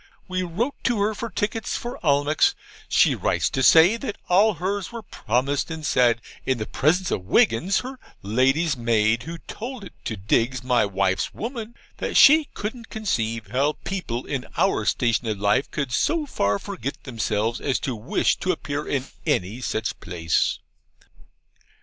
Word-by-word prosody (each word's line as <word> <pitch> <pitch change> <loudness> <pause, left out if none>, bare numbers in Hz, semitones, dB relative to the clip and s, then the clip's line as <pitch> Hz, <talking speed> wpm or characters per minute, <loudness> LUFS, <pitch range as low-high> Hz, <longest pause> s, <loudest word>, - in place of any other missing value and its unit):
We 185 0 -2
wrote 190 +10 -3
to 240 -4 +2
her 210 +2 +1
for 230 +2 -5
tickets 220 +1 -2
for 240 +1 -7
Almack's; 145 0 +3 0.3
she - - +4
writes - - 0
to 135 - -1
say 165 - +6
that 230 -4 -5
all 200 +3 +4
hers 190 +4 -3
were 230 -1 -7
promised; 135 - -1
and 160 -2 -5
said, 120 -3 +3 0.2
in 130 -2 0
the 110 - -3
presence 175 - +1
of 90 - -2
Wiggins, 120 - +3
her 255 +1 -8 0.2
lady's 135 +9 +2
maid, 115 -1 +2
who 165 +7 -7
told 240 0 -7
it 190 - -10
to 110 - -3
Diggs, 115 +5 0
my 125 -4 +2
wife's 95 -1 0
woman, 235 0 -5 0.2
that - - -1
she 310 +2 +8
couldn't 225 +2 -5
conceive 115 - -2
how 140 +4 +2
people 130 -11 -4
in 135 -3 -4
our - - +2
station 115 -1 +1
of 110 -2 -1
life 105 +6 +1
could 140 -4 -3
so 315 - +1
far 100 - 0
forget 130 +6 -6
themselves 115 -2 -1
as 135 - 0
to 130 - -2
wish 110 +3 0
to 185 - 0
appear 145 -3 -4
in 135 -2 -1 0.2
any 100 +8 0
such 110 -3 -2
place! 85 -2 0
140 Hz, 165 wpm, -24 LUFS, -, 0.3 s, she